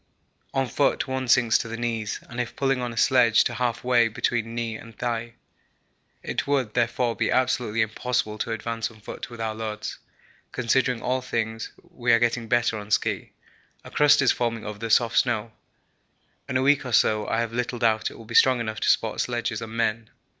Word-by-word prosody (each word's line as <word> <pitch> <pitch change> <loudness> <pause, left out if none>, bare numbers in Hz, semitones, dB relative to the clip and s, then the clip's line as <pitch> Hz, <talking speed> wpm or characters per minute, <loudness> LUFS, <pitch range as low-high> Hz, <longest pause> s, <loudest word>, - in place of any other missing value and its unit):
On 135 -1 0
foot 140 +3 +1
one 130 0 -3
sinks 120 -2 +4
to 115 - -4
the 115 0 -5
knees, 115 -3 -2
and 120 0 -3
if 120 - -6
pulling 135 -2 0
on 120 -1 -3
a 115 - -10
sledge 120 -3 +5
to 120 - -2
half 120 -1 -2
way 120 -2 +4
between 115 +1 -2
knee 115 -1 -2
and 115 -1 -12
thigh. 115 -1 -3 0.9
It - - -3
would, 135 -7 0
therefore, 120 0 0
be - - 0
absolutely 125 -3 +1
impossible 110 -1 -2
to 115 - -2
advance 115 0 -3
on 110 -2 -17
foot 105 - -8
with 120 -1 -10
our 110 -1 -2
loads. 110 -1 -5 0.5
Considering 125 0 +1
all 130 +1 0
things, 110 -2 -3 0.2
we 120 -1 0
are - - +7
getting 120 0 0
better 120 -2 +1
on 105 0 -10
ski. 105 - 0 0.5
A - - -12
crust 145 -1 +5
is 130 - +5
forming 115 -2 -2
over 105 -1 -6
the 115 0 -4
soft 115 +1 +4
snow. 115 -2 -1 1.0
In 130 - +1
a 130 - +1
week 145 +1 +4
or 125 -2 -5
so 110 -1 +3
I 115 - 0
have 115 -1 -3
little 125 +1 -2
doubt 110 -2 +1
it - - -13
will 115 - -12
be 115 - -9
strong 130 0 +5
enough 110 -2 -3
to - - +1
support - - +2
sledges 120 -2 -2
and 115 0 -7
men. 115 -1 -1
115 Hz, 205 wpm, -25 LUFS, 110-125 Hz, 1.0 s, are